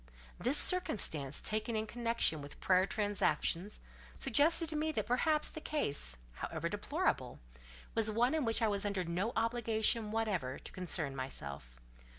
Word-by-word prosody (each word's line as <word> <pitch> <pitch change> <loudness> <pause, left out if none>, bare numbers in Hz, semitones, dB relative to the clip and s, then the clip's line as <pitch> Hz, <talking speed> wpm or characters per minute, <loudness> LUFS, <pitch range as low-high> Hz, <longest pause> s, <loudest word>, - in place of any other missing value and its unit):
This 260 +5 +2
circumstance, 160 - +3
taken 215 +2 -1
in 215 0 -1
connection 230 -9 +1
with 145 0 -11
prior 185 0 +3
transactions, 205 -2 0 0.4
suggested 325 +3 +3
to 315 - -2
me 310 +1 0
that 215 - -1
perhaps 300 +7 +2
the 315 - -5
case, 140 - 0 0.2
however - - -4
deplorable, - - -2 0.5
was 225 -1 +3
one 235 +5 +2
in 315 -2 0
which 225 0 +1
I - - +4
was 200 -1 -1
under 200 -3 -1
no 180 +7 -2
obligation 225 -1 +1
whatever 200 -12 -2
to - - -11
concern 165 -6 -3
myself. 70 - -7
215 Hz, 150 wpm, -34 LUFS, 170-240 Hz, 0.5 s, I